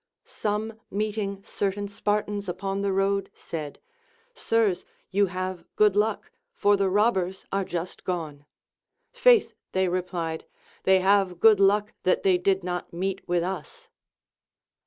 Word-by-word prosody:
Some 215 Hz, +1 st, -3 dB
meeting 205 Hz, -1 st, -2 dB
certain 200 Hz, 0 st, -2 dB
Spartans 205 Hz, -1 st, -2 dB
upon 195 Hz, +2 st, -3 dB
the 200 Hz, -1 st, 0 dB
road 195 Hz, +1 st, +1 dB
said. 155 Hz, -3 st, -6 dB, 0.5 s
Sirs, 225 Hz, -, +1 dB, 0.3 s
you 200 Hz, +1 st, +3 dB
have 185 Hz, -1 st, -4 dB
good 210 Hz, -2 st, +4 dB
luck, 210 Hz, +1 st, 0 dB, 0.2 s
for 205 Hz, 0 st, +4 dB
the 195 Hz, -1 st, +1 dB
robbers 190 Hz, -2 st, +1 dB
are 195 Hz, 0 st, +1 dB
just 175 Hz, -1 st, -5 dB
gone. 155 Hz, -5 st, -4 dB, 0.7 s
Faith, -, -, +4 dB, 0.2 s
they 190 Hz, 0 st, +2 dB
replied, 175 Hz, -3 st, -3 dB, 0.4 s
they 190 Hz, 0 st, +5 dB
have 190 Hz, -2 st, +3 dB
good 220 Hz, -1 st, +6 dB
luck 205 Hz, +2 st, +3 dB
that 185 Hz, -, +1 dB
tliey 185 Hz, -2 st, +3 dB
did 190 Hz, 0 st, +2 dB
not 180 Hz, 0 st, -4 dB
meet 190 Hz, +2 st, -2 dB
with 175 Hz, -1 st, +1 dB
us. 460 Hz, -, -6 dB
195 Hz, 135 wpm, -26 LUFS, 180-205 Hz, 0.7 s, good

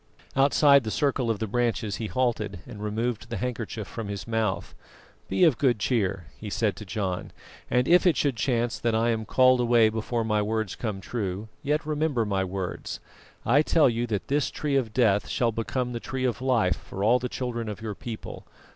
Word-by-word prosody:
Outside 140 Hz, 0 st, +5 dB
the 110 Hz, -, -3 dB
circle 130 Hz, 0 st, 0 dB
of 115 Hz, -, +1 dB
the 110 Hz, -, -2 dB
branches 115 Hz, -2 st, -1 dB
he 110 Hz, -, -3 dB
halted, 110 Hz, -7 st, -1 dB
and 110 Hz, -4 st, -9 dB
removed 115 Hz, +2 st, -2 dB
the 115 Hz, -, -3 dB
handkerchief 115 Hz, -4 st, -4 dB
from 115 Hz, -3 st, -6 dB
his 100 Hz, +1 st, -5 dB
mouth. 110 Hz, -5 st, -1 dB, 0.6 s
"Be -, -, +2 dB
of 155 Hz, -9 st, +5 dB
good 130 Hz, -4 st, +3 dB
cheer," 100 Hz, -5 st, 0 dB
he 105 Hz, -, -7 dB
said 105 Hz, 0 st, 0 dB
to 105 Hz, -, -8 dB
John, 95 Hz, -2 st, -3 dB, 0.4 s
"and 125 Hz, +1 st, +2 dB
if 180 Hz, +2 st, +5 dB
it 175 Hz, -, +3 dB
should 140 Hz, -4 st, +1 dB
chance 120 Hz, 0 st, 0 dB
that 115 Hz, -1 st, 0 dB
I 115 Hz, +1 st, +2 dB
am 110 Hz, -1 st, -2 dB
called 130 Hz, +1 st, +4 dB
away 120 Hz, -2 st, +4 dB
before 115 Hz, +1 st, -2 dB
my 105 Hz, -1 st, +1 dB
words 110 Hz, -2 st, -1 dB
come 105 Hz, -5 st, -4 dB
true, 100 Hz, -1 st, -4 dB
yet 150 Hz, +2 st, 0 dB
remember 150 Hz, -6 st, 0 dB
my 100 Hz, -2 st, 0 dB
words. 95 Hz, -1 st, -4 dB, 0.5 s
I 135 Hz, +6 st, +5 dB
tell 155 Hz, -4 st, +4 dB
you 120 Hz, +1 st, -1 dB
that 105 Hz, -4 st, -3 dB
this 145 Hz, 0 st, +1 dB
Tree 145 Hz, -2 st, -2 dB
of 125 Hz, -5 st, +1 dB
Death 105 Hz, -4 st, +2 dB
shall 120 Hz, -2 st, +1 dB
become 120 Hz, +3 st, -2 dB
the 120 Hz, -, -3 dB
Tree 130 Hz, +2 st, -3 dB
of 125 Hz, -2 st, -1 dB
Life 115 Hz, -10 st, +2 dB
for 95 Hz, -, -6 dB
all 120 Hz, +4 st, +4 dB
the 125 Hz, 0 st, -3 dB
children 120 Hz, -3 st, -3 dB
of 105 Hz, -, -6 dB
your 110 Hz, -2 st, -4 dB
people. 110 Hz, +2 st, -8 dB
115 Hz, 200 wpm, -26 LUFS, 105-125 Hz, 0.6 s, Outside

